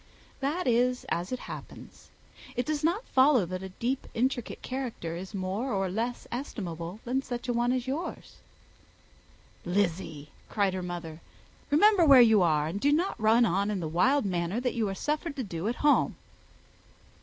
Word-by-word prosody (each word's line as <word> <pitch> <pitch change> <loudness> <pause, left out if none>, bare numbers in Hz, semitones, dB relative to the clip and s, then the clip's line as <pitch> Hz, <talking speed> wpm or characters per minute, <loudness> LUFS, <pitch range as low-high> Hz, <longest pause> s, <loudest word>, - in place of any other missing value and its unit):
"That 295 +7 -1
is 250 +1 +2
as 175 +5 -2
it 255 - -1
happens. - - -10 0.5
It 245 - -1
does 305 -1 -2
not 350 +9 +1
necessarily - - -28
follow 260 -5 +5
that 185 +2 -5
a 190 - -6
deep, 245 +8 -3
intricate 245 0 -1
character 245 -11 -4
is 190 +4 -7
more 195 +7 -2
or 195 -3 0
less 235 +5 -3
estimable 185 - -5
than 255 +2 0
such 245 -1 -6
a 245 - +1
one 240 +1 +1
as 255 -1 -1
yours." 285 +7 -5 1.3
"Lizzy," 175 -5 -1 0.2
cried 200 -3 +1
her 185 - -3
mother, 170 -2 -6 0.5
"remember 370 +6 +5
where 280 -5 +8
you 220 -4 +6
are, 155 -4 +2
and 180 +6 -4
do 285 - +3
not 325 - 0
run 225 +2 +5
on 200 +1 +1
in 205 -2 -1
the 165 - -3
wild 245 - +2
manner 180 +2 -1
that 250 0 -1
you 220 -4 0
are 195 - -4
suffered 300 - -2
to 265 - -3
do 175 -2 -4
at 235 - -1
home." 295 - +4
230 Hz, 180 wpm, -28 LUFS, 185-260 Hz, 1.3 s, where